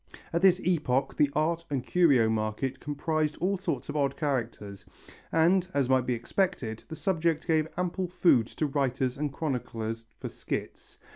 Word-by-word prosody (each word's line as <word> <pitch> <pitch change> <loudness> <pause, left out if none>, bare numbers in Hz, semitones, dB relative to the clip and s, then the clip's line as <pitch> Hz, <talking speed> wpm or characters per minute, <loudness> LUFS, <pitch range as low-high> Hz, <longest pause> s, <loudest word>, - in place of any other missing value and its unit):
At 170 - +1
this 190 -1 +5
epoch 145 -7 +1
the 145 - +3
art 165 +2 +1
and 135 -3 -2
curio 140 -11 +4
market 110 +4 -1
comprised 150 +1 -1
all 190 +4 0
sorts 190 - -3
of - - -5
odd 140 -2 0
characters 115 -9 -3 0.5
and, 175 +3 +3
as 135 -3 +2
might 130 -1 +3
be 125 - +1
expected, 115 - -2
the 160 - -7
subject 165 -3 0
gave 160 -2 +2
ample 180 +1 -1
food 170 -10 +3
to 155 - -2
writers 135 -3 0
and 145 0 -2
chroniclers 115 -6 -4
for - - -5
skits. - - -6
145 Hz, 160 wpm, -28 LUFS, 125-170 Hz, 0.5 s, this